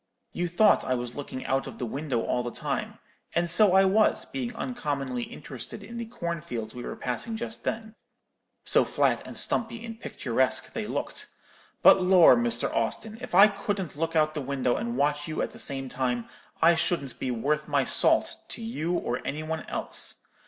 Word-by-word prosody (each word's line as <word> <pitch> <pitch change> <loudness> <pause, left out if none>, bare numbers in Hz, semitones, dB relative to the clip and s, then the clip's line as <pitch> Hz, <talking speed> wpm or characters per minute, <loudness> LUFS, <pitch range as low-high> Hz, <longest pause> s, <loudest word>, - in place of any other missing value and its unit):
You 175 0 -1
thought 200 +5 +4
I 130 - 0
was 120 -1 -4
looking 140 -2 -6
out 135 0 0
of - - -9
the 125 - -3
window 135 0 -2
all 125 - 0
the 120 - -3
time; - - -4 0.4
and 170 0 +2
so 190 +3 +4
I 195 0 +6
was, 210 +3 +3
being 250 -3 -4
uncommonly 140 - -3
interested 140 - -7
in 230 +3 -9
the 235 -1 -4
corn 170 -8 -4
fields 115 -5 -5
we 125 - -7
were - - -5
passing 125 - -4
just 225 0 -6
then, 220 0 -3 0.7
so - - +5
flat - - +1
and - - -6
stumpy 230 0 +1
and 225 -1 -8
picturesque - - -1
they - - -3
looked; - - -4 0.6
but, - - +8
lor', 180 -6 +7
Mr. 120 0 0
Austin, 215 - -2
if 250 -8 -5
I 200 +3 +9
couldn't 200 -5 -3
look 165 +2 -2
out 155 -1 +4
of - - -16
the 150 - -3
window 130 -2 0
and 120 +1 -3
watch 145 +1 +1
you 155 - -2
at - - -3
the - - -12
same 135 -2 0
time, 125 -2 -2 0.4
I 170 +1 +7
shouldn't 150 -5 -1
be 130 - -2
worth 145 +6 -1
my - - +2
salt - - +4
to 230 - -6
you 175 -7 -2
or 125 -7 -1
any 155 +2 -4
one 160 0 -4
else. - - -2
155 Hz, 195 wpm, -27 LUFS, 130-205 Hz, 0.7 s, I